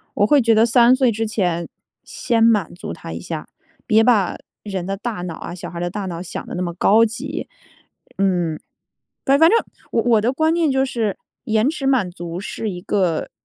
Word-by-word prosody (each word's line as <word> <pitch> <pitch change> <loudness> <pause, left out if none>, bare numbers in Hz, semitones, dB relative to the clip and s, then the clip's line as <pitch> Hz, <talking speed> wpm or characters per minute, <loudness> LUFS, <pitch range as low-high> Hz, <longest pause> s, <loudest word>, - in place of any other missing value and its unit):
我 205 - +3
会 285 +5 +4
觉 230 -1 +3
得 220 +1 +5
3 240 +2 +5
岁 260 -2 +3
之 225 +1 -2
前 175 -6 -1 0.3
先 230 -2 0
满 215 -8 +3
足 175 - -7
他 80 - -8
一 85 - -5
下， 160 - -6 0.4
别 220 -1 +4
把 220 -7 +2 0.3
人 190 -4 -4
的 195 0 -2
大 220 -3 -4
脑 175 -2 -5
啊， - - -7
小 175 -1 -7
孩 170 - -9
儿 - - -4
的 175 - -1
大 200 0 -4
脑 170 -2 -5
想 175 - -6
得 - - -6
那 180 - -2
么 170 -1 -3
高 210 +6 +4
级。 275 +8 -5 0.7
嗯， 175 -5 0 0.7
但 275 +1 +4
反 325 +2 +7
正 460 - +5 0.3
我 230 -1 +3
的 225 +4 +1
观 315 +4 +1
念 330 -3 +2
就 265 0 +2
是 230 -6 -2 0.3
延 220 +2 +2
迟 300 -4 -4
满 250 -9 +2
足 175 -1 -7
是 210 +3 -5
一 180 -2 -7
个 180 -5 0
215 Hz, 220 characters per minute, -20 LUFS, 180-245 Hz, 0.7 s, 反